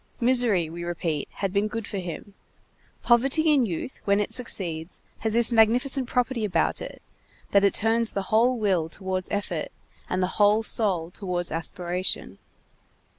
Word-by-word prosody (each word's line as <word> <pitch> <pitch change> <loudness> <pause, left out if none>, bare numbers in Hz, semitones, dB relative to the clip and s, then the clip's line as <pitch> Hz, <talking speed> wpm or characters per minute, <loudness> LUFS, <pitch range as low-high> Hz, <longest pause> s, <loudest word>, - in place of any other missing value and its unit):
Misery, 235 -8 +3
we 170 +2 -7
repeat, 170 -3 -3
had 195 -2 -3
been 200 +1 +1
good 225 0 -5
for 200 - -4
him. 180 +3 -7 0.7
Poverty 275 +6 +4
in 265 -5 +3
youth, 185 +8 -5
when 200 0 +2
it 210 - -2
succeeds, 175 -9 -3 0.2
has 220 -1 -1
this 235 +1 +4
magnificent 245 +4 +3
property 250 -2 0
about 180 -6 0
it, - - -9 0.5
that 200 0 +4
it 200 - +3
turns 225 +1 +1
the 195 - -2
whole 245 +3 +4
will 185 -7 0
towards 185 +1 -4
effort, 205 0 -3 0.4
and 185 0 0
the 185 +3 -2
whole 210 +2 +4
soul 185 -7 0
towards 180 -3 -2
aspiration. 175 +2 -2
205 Hz, 155 wpm, -25 LUFS, 180-235 Hz, 0.7 s, Poverty